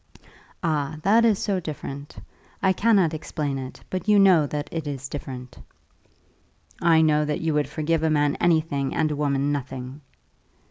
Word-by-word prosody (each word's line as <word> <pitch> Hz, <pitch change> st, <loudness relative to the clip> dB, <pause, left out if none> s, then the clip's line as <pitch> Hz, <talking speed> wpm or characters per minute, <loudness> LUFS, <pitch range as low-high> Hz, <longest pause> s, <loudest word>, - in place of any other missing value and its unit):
"Ah, 155 Hz, -2 st, -1 dB
that 220 Hz, +5 st, +4 dB
is 220 Hz, -4 st, +3 dB
so 195 Hz, -2 st, -1 dB
different! 145 Hz, -3 st, -7 dB, 0.5 s
I 190 Hz, -1 st, +4 dB
cannot 195 Hz, -6 st, +3 dB
explain 145 Hz, -3 st, -3 dB
it, 130 Hz, -1 st, -8 dB
but 185 Hz, +1 st, -3 dB
you 210 Hz, -1 st, +5 dB
know 185 Hz, -7 st, +5 dB
that 145 Hz, +1 st, -4 dB
it 160 Hz, -2 st, -4 dB
is 135 Hz, -2 st, -5 dB
different." 125 Hz, -, -8 dB, 1.2 s
"I 165 Hz, -1 st, +5 dB
know 150 Hz, -1 st, +3 dB
that 150 Hz, 0 st, -2 dB
you 160 Hz, -1 st, 0 dB
would 150 Hz, -1 st, 0 dB
forgive 160 Hz, +1 st, -1 dB
a 160 Hz, -, +1 dB
man 145 Hz, -1 st, +2 dB
anything, 155 Hz, -5 st, +1 dB
and 155 Hz, -1 st, +1 dB
a -, -, -1 dB
woman 140 Hz, -1 st, 0 dB
nothing." 135 Hz, 0 st, -5 dB
150 Hz, 165 wpm, -24 LUFS, 140-165 Hz, 1.2 s, you